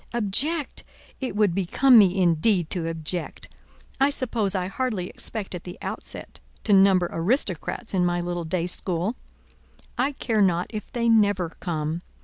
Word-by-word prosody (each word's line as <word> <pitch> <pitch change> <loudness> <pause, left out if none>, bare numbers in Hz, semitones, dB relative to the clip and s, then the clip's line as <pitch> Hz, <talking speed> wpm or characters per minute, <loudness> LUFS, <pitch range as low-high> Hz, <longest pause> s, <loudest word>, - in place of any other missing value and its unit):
Object? 270 - -1 0.4
It 255 -7 -4
would 205 -4 +3
become 225 +7 +5
me 195 -2 +4
indeed 175 0 +2
to 170 -4 -1
object! 165 0 -4 0.5
I 275 +1 +4
suppose 230 -8 0
I 185 -1 0
hardly 200 -2 -2
expect 215 -4 -6
at 180 - -6
the 180 - -9
outset - - -6 0.2
to 210 - +2
number 190 -2 +5
aristocrats 200 - -1
in 185 -2 +2
my 175 0 +1
little 175 0 -3
day 170 +1 -1
school; 180 +4 -2 0.8
I 275 +3 +1
care 225 -5 0
not 180 -2 +2
if 215 -2 -7
they 235 -1 -1
never 205 -6 +3
come. 160 -1 -3
190 Hz, 150 wpm, -25 LUFS, 175-225 Hz, 0.8 s, become